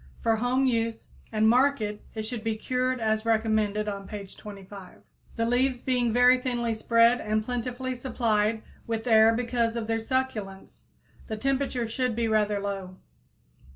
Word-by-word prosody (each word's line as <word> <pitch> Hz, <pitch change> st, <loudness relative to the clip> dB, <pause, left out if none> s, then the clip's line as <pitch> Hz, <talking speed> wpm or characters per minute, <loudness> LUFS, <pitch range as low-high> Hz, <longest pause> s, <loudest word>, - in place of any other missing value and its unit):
For 225 Hz, -1 st, +1 dB
home 250 Hz, +3 st, +1 dB
use 230 Hz, -2 st, -1 dB, 0.3 s
and 220 Hz, 0 st, +2 dB
market 235 Hz, -4 st, +2 dB
it 220 Hz, -, -3 dB
should 220 Hz, 0 st, -5 dB
be 225 Hz, -1 st, -1 dB
cured 255 Hz, +2 st, -1 dB
as 220 Hz, -1 st, 0 dB
recommended 215 Hz, -2 st, +1 dB
on 200 Hz, -1 st, -5 dB
page 200 Hz, -2 st, -8 dB
25, 195 Hz, -2 st, -11 dB, 0.3 s
the 230 Hz, -, 0 dB
leaves 245 Hz, +1 st, +1 dB
being 245 Hz, -3 st, +1 dB
very 250 Hz, +2 st, +5 dB
thinly 240 Hz, -2 st, -1 dB
spread 230 Hz, +2 st, +3 dB
and 215 Hz, 0 st, -1 dB
plentifully 250 Hz, +1 st, -3 dB
supplied 225 Hz, -4 st, 0 dB, 0.2 s
with 225 Hz, 0 st, -3 dB
air 220 Hz, -1 st, +6 dB
because 235 Hz, -1 st, 0 dB
of 230 Hz, -2 st, -2 dB
their 225 Hz, 0 st, -1 dB
succulence. 225 Hz, -6 st, -4 dB, 0.4 s
The 220 Hz, -, -4 dB
temperature 265 Hz, -1 st, -1 dB
should 250 Hz, 0 st, -1 dB
be 230 Hz, 0 st, 0 dB
rather 210 Hz, -2 st, +1 dB
low. 195 Hz, -2 st, -5 dB
225 Hz, 155 wpm, -27 LUFS, 215-245 Hz, 0.4 s, air